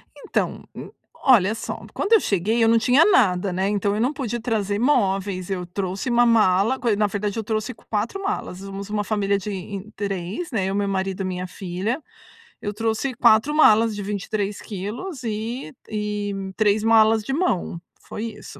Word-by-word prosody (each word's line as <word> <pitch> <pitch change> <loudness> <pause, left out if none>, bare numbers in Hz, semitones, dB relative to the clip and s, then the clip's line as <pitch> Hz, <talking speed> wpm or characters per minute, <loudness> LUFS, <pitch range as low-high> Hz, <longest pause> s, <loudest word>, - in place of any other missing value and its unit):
Então, - - -2
hum, - - -8 0.3
olha 220 -6 +5
só, 225 - -6
quando 405 - 0
eu 445 - +8
cheguei, 215 - +1
eu - - +5
não 230 0 +5
tinha 250 +6 +5
nada, 195 - +3
né, 190 +2 0
então 205 -1 0
eu 215 - -1
não 255 +5 +1
pude 240 -4 -3
trazer 210 -4 -1
móveis, 195 -7 +1
eu 185 -2 -2
trouxe 190 +5 -3
uma 240 0 +4
mala, 220 +1 +3
co 245 - 0
na 210 0 +2
verdade 205 +1 -3
eu 225 - -2
trouxe 220 +3 -2
4 220 - -3
malas, 390 - -3
somos 195 +1 -7
uma 210 0 -1
família 200 -1 0
de 200 +2 -5
em 195 +1 -6
3, 200 - -4
né, 210 -6 0
eu, 195 - -1
meu 200 0 0
marido 190 0 -2
e - - -3
minha 185 0 -3
filha. 190 - -3 0.6
Eu 205 - -3
trouxe 225 +4 -1
4 240 +4 +4
malas 225 -6 +5
de 205 - -5
23 205 0 -3
quilos 230 - -6
e 220 - -4 0.2
e 210 -1 -2 0.2
3 210 -1 +2
malas 225 -1 +5
de 270 - -4
mão. 270 - 0 0.2
Foi 210 - -7
isso. 225 -2 -9
210 Hz, 185 wpm, -23 LUFS, 195-230 Hz, 0.6 s, eu